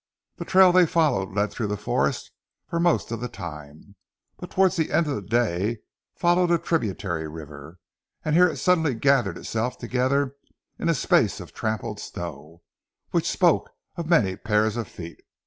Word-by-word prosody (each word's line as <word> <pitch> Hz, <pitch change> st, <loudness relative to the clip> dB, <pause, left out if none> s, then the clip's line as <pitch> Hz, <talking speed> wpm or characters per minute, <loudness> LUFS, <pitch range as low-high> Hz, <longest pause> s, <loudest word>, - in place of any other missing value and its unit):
The -, -, -6 dB
trail 190 Hz, -1 st, +6 dB
they 180 Hz, -1 st, +5 dB
followed 150 Hz, -, +1 dB
led 105 Hz, 0 st, +1 dB
through 110 Hz, 0 st, -3 dB
the 105 Hz, 0 st, -2 dB
forest 105 Hz, -, -1 dB, 0.4 s
for 170 Hz, -, -2 dB
most 170 Hz, -7 st, +1 dB
of 115 Hz, -, -3 dB
the 125 Hz, -, -3 dB
time, 80 Hz, -5 st, -10 dB, 0.4 s
but 180 Hz, -, -8 dB
towards 190 Hz, 0 st, +2 dB
the 160 Hz, -3 st, -1 dB
end 170 Hz, -, +3 dB
of 145 Hz, -, -2 dB
the 105 Hz, -, -3 dB
day 110 Hz, 0 st, 0 dB, 0.3 s
followed 175 Hz, 0 st, +2 dB
a 170 Hz, -, +4 dB
tributary 100 Hz, -, -2 dB
river, 75 Hz, +1 st, -10 dB, 0.5 s
and 155 Hz, -, +1 dB
here 180 Hz, +1 st, +6 dB
it -, -, -5 dB
suddenly 160 Hz, -7 st, +2 dB
gathered 120 Hz, -6 st, +2 dB
itself 115 Hz, +3 st, -3 dB
together 130 Hz, +2 st, 0 dB, 0.4 s
in 170 Hz, -, 0 dB
a 165 Hz, -, +3 dB
space 125 Hz, -, +2 dB
of -, -, -10 dB
trampled 110 Hz, -1 st, -3 dB
snow, 85 Hz, -2 st, -8 dB, 0.5 s
which -, -, +1 dB
spoke -, -, +2 dB, 0.3 s
of 170 Hz, -1 st, -5 dB
many 105 Hz, -, +3 dB
pairs 105 Hz, +1 st, +1 dB
of 115 Hz, -3 st, -3 dB
feet. 85 Hz, -1 st, -10 dB
115 Hz, 170 wpm, -24 LUFS, -, 0.5 s, trail